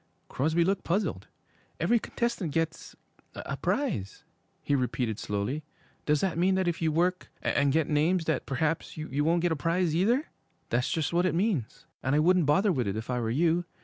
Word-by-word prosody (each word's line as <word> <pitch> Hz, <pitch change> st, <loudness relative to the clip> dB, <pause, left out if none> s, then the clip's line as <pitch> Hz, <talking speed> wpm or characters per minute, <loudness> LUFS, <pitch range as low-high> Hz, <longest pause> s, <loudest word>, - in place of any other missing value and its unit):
Crosby 160 Hz, +5 st, +1 dB
looked 195 Hz, +1 st, 0 dB
puzzled. 195 Hz, +5 st, -1 dB, 0.5 s
'Every 235 Hz, 0 st, +3 dB
contestant 230 Hz, -8 st, -2 dB
gets 165 Hz, +1 st, -2 dB, 0.4 s
a -, -, -4 dB
prize,' 105 Hz, -, -2 dB, 0.4 s
he -, -, 0 dB
repeated 125 Hz, -4 st, -1 dB
slowly. 105 Hz, +9 st, -2 dB, 0.4 s
'Does 150 Hz, -1 st, +3 dB
that 185 Hz, -4 st, 0 dB
mean 190 Hz, +2 st, +3 dB
that 190 Hz, -1 st, +1 dB
if 170 Hz, -1 st, -1 dB
you 160 Hz, -1 st, +2 dB
work 180 Hz, +3 st, 0 dB
and 140 Hz, -1 st, +2 dB
get 155 Hz, +1 st, +2 dB
names 160 Hz, +3 st, +2 dB
that 160 Hz, -, -1 dB
perhaps 155 Hz, +5 st, -1 dB
you 145 Hz, -2 st, -2 dB
won't 165 Hz, +2 st, +2 dB
get 175 Hz, -, +2 dB
a -, -, +2 dB
prize 165 Hz, +2 st, 0 dB
either?' 235 Hz, -, +2 dB, 0.5 s
'That's 125 Hz, +3 st, +1 dB
just 160 Hz, 0 st, -1 dB
what 175 Hz, +2 st, +3 dB
it 180 Hz, -, -1 dB
means, 170 Hz, -, -1 dB, 0.2 s
and 130 Hz, +2 st, +1 dB
I -, -, +4 dB
wouldn't 175 Hz, 0 st, +4 dB
bother 190 Hz, +8 st, +4 dB
with 125 Hz, -, 0 dB
it 100 Hz, +2 st, -2 dB
if 110 Hz, +3 st, -4 dB
I 125 Hz, -, 0 dB
were 115 Hz, -2 st, -1 dB
you. 165 Hz, +7 st, +2 dB
160 Hz, 190 wpm, -28 LUFS, 140-180 Hz, 0.5 s, I